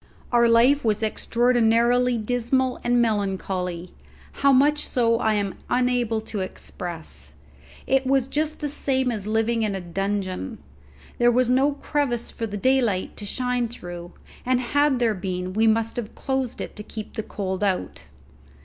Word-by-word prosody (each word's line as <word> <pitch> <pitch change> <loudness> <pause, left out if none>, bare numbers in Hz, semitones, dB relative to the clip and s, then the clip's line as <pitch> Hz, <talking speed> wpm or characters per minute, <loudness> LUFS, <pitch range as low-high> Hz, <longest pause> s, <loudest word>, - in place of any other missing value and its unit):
Our 235 -1 +5
life 250 +5 +5
was 220 -1 +1
extraordinarily 240 +2 +2
dismal 245 +3 0
and 245 0 +2
melancholy, 190 -4 -2 0.4
how 280 0 +3
much 290 +3 +4
so 230 -2 +2
I 220 -2 +2
am 200 -2 -1 0.2
unable 245 -3 +1
to 215 -1 -5
express. 175 -3 -7 0.5
It 270 0 +2
was 270 -1 +2
just 305 +3 -2
the 295 - -1
same 265 -3 0
as 210 -3 -4
living 225 +1 +1
in 210 -3 0
a - - -3
dungeon. 190 - -3 0.6
There 240 0 +5
was 245 0 +2
no 270 +3 +3
crevice 280 -4 -2
for 230 - -4
the 205 -1 -5
daylight 240 -5 +1
to 205 - -5
shine 250 +1 -1
through, 175 -6 -9 0.3
and 255 0 +2
had 285 +2 +2
there 235 -3 +2
been 185 -1 -4
we 220 +2 +3
must 225 +1 +1
have 225 -3 -5
closed 265 -3 -2
it - - -6
to 210 - -5
keep 215 0 -8
the - - -3
cold 190 -2 -4
out. 195 -3 -1
230 Hz, 160 wpm, -24 LUFS, 205-255 Hz, 0.6 s, Our